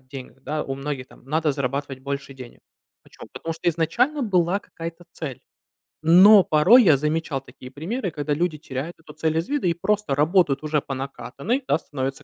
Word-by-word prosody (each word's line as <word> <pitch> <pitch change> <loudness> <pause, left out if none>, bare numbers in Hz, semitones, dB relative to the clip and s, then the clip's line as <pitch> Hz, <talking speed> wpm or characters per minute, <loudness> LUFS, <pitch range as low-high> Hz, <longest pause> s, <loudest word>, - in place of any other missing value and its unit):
деньгах, 130 0 -11
да, 150 +2 -2
у 135 - -4
многих 135 -1 -5
там: - - -19
"Надо 155 +2 0
зарабатывать 140 0 -3
больше 140 0 -5
денег". 130 -2 -12 0.4
Почему? - - -14
Потому 165 - -5
что 165 +2 -2
изначально 235 - +1
была 185 -3 +2
какая-то 165 +1 -9
цель. 140 -6 -6 0.6
Но 190 +5 +8
порой 185 +13 +6
я 160 -6 +6
замечал 150 -1 -1
такие 130 0 -13
примеры, 185 - -4
когда 150 -1 -2
люди 165 0 -1
теряют 145 +3 -6
эту 155 -2 -14
цель 160 +1 -1
из 165 - -1
вида 285 -9 0
и 170 - +2
просто 205 -1 -1
работают 150 0 +2
уже 150 -1 0
по 135 - -6
накатанной, 140 - -3
да, 150 - +2
становятся 135 -1 -5
155 Hz, 180 wpm, -23 LUFS, 135-175 Hz, 0.6 s, Но